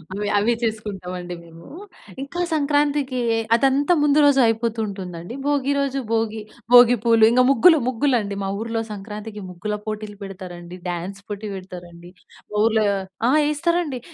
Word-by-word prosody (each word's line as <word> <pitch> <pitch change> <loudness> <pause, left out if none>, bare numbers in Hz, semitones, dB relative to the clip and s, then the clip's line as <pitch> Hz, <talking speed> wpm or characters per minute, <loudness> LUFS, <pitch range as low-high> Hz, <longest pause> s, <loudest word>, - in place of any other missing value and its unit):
అవి 205 +1 -3
అవి 220 +4 +2
చేసుకుంటాం 210 -5 -4
అండి 175 0 -6
మేము. 165 0 -15 0.6
ఇంకా 285 +6 -4
సంక్రాంతికి 290 -3 +1 0.4
అదంతా 275 +6 +2
ముందు 295 0 +4
రోజు 285 -1 +4
అయిపోతుంటుందండి. 215 -4 -3
భోగి 285 -1 +1
రోజు, 275 -1 -1
భోగి 225 -1 0 0.3
భోగి 245 0 +8
పూలు, 230 -2 +4
ఇంకా 255 +1 +4
ముగ్గులు 315 +6 +6
ముగ్గులండి. 235 -5 0
మా 195 - -2
ఊర్లో 225 0 -2
సంక్రాంతికి 210 +1 -7
ముగ్గుల 180 +4 -4
పోటీలు 215 -1 -6
పెడతారండి, 180 -2 -9
డాన్స్ 180 +3 -5
పోటీ 205 0 -6
పెడతారండి. 175 -2 -10 0.4
మా 210 - -3
ఊర్లో 220 -1 +2 0.4
ఆ! - - +3 0.2
వేస్తారండి. 300 -2 -1
220 Hz, 135 wpm, -22 LUFS, 195-270 Hz, 0.6 s, భోగి